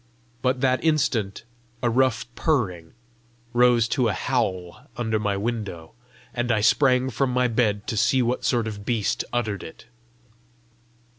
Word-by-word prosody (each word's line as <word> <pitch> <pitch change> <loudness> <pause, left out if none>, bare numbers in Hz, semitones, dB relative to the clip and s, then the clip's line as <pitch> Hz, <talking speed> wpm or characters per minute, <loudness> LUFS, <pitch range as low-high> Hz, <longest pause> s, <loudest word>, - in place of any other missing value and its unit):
But 130 0 0
that 130 -1 +2
instant 135 -11 0 0.4
a - - +3
rough 125 -1 +2
purring 95 - -1 0.6
rose 120 -1 +4
to 125 -4 +1
a 105 - 0
howl 95 -5 -2
under 110 -2 0
my 100 -1 -1
window, 105 -7 -4 0.4
and 120 0 -1
I 110 - +2
sprang 130 +3 +3
from 135 +3 0
my 125 0 +2
bed 110 -3 0
to 115 - -3
see 120 +4 +3
what 120 +2 -1
sort 120 -3 +1
of 105 -2 -6
beast 110 -2 0
uttered 110 -5 -2
it. 80 - -11
120 Hz, 145 wpm, -24 LUFS, 105-125 Hz, 0.6 s, rose